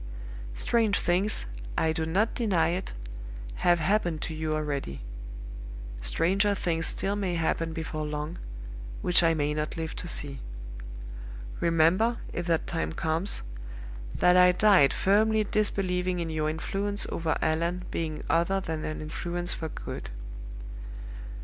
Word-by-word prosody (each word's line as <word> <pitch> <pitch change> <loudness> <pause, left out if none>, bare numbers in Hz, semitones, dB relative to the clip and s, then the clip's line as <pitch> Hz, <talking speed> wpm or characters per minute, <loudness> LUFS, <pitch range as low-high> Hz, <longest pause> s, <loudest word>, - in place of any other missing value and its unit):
Strange 215 - +2
things, 185 - +2 0.3
I 160 - +3
do 160 -1 -1
not 200 +7 +2
deny 195 -10 +2
it, 180 +2 -2 0.6
have 175 0 +4
happened 175 -1 +1
to 165 - -3
you 155 0 -1
already. 145 - -2 1.0
Stranger 190 - +2
things 165 -4 +1
still 195 +1 0
may 190 -4 0
happen 165 0 +1
before 160 -2 -3
long, 150 +3 -3 0.6
which 180 0 +6
I 165 -1 +4
may 150 -1 +1
not 150 +1 -2
live 160 0 -3
to 180 - -4
see. 140 -4 -3 1.2
Remember, 170 +8 +4 0.2
if 175 0 -3
that 165 -2 +2
time 165 -1 -2
comes, 165 - 0 0.7
that 180 0 +5
I 180 0 +8
died 185 -8 +6
firmly 215 +2 +4
disbelieving 185 -4 +1
in 165 -1 -2
your 155 -1 +1
influence 195 +6 0
over 165 -1 0
Allan 170 +3 +1
being 155 -2 -2
other 170 +5 +3
than 160 -4 -3
an 155 - -3
influence 175 +3 -1
for 160 - -4
good. - - -6
170 Hz, 135 wpm, -29 LUFS, 160-190 Hz, 1.2 s, I